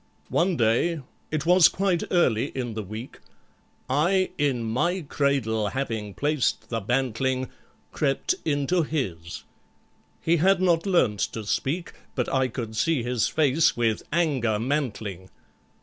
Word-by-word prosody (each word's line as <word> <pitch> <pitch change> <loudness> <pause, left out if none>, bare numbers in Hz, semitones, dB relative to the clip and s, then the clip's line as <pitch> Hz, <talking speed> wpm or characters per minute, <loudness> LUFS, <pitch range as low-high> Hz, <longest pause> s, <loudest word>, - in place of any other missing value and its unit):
"One 175 0 +1
day—it 140 +5 -1
was 175 -1 +7
quite 185 -1 0
early 130 -9 +2
in 120 -3 -3
the 110 - -3
week— 110 +5 -8 0.7
I 175 +8 +2
in 135 -5 +1
MY 170 +12 0
cradle 135 -8 0
having 110 -3 -3
placed 145 - 0
the 115 - -1
bantling— 130 +3 -1 0.4
Crept 140 - 0
into 150 +4 +1
his! 95 - -4 0.8
He 170 +1 +2
had 190 +3 +4
not 175 -1 +2
learnt 125 - +2
to 110 -2 -5
speak, 155 - -2 0.2
But 125 - -1
I 130 -1 +2
could 115 -2 -6
see 145 +2 +1
his 120 -2 0
face 155 -1 +2
with 115 -3 +1
anger 140 -10 +1
mantling. 110 - -3
135 Hz, 130 wpm, -25 LUFS, 115-165 Hz, 0.8 s, was